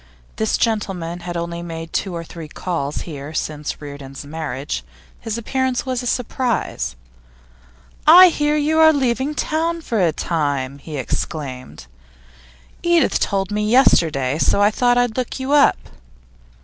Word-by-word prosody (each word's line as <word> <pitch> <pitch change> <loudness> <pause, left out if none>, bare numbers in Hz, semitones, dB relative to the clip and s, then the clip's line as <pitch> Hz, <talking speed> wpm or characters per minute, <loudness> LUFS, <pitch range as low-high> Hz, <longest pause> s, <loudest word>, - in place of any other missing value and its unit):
This 220 0 +1
gentleman 190 -7 -1
had 175 0 -5
only 170 0 -4
made 165 -1 -7
two 190 -3 -2
or 165 - -4
three 165 -1 -9
calls 150 -3 -3
here 150 -1 -7
since 150 -1 -3
Reardon's 140 -1 -9
marriage; 150 -2 -4 0.4
his 225 -1 -4
appearance 260 +2 -1
was 255 -1 -2
a 245 - -4
surprise. 230 - -1 1.1
'I 360 +3 +10
hear 295 -2 +1
you 305 +2 +1
are 315 0 +7
leaving 265 +1 0
town 330 +3 -1
for 230 -9 -1
a 170 -3 +3
time,' 145 -4 -2
he 150 +1 -7
exclaimed. 130 - -5 1.0
'Edith 345 -1 +3
told 195 -1 -1
me 210 0 0
yesterday, 155 - +3
so - - +3
I 205 +1 +4
thought 245 +2 +2
I'd 245 -2 +1
look 255 +1 -3
you 260 +1 -3
up. 290 -1 +5
185 Hz, 145 wpm, -20 LUFS, 155-255 Hz, 1.1 s, I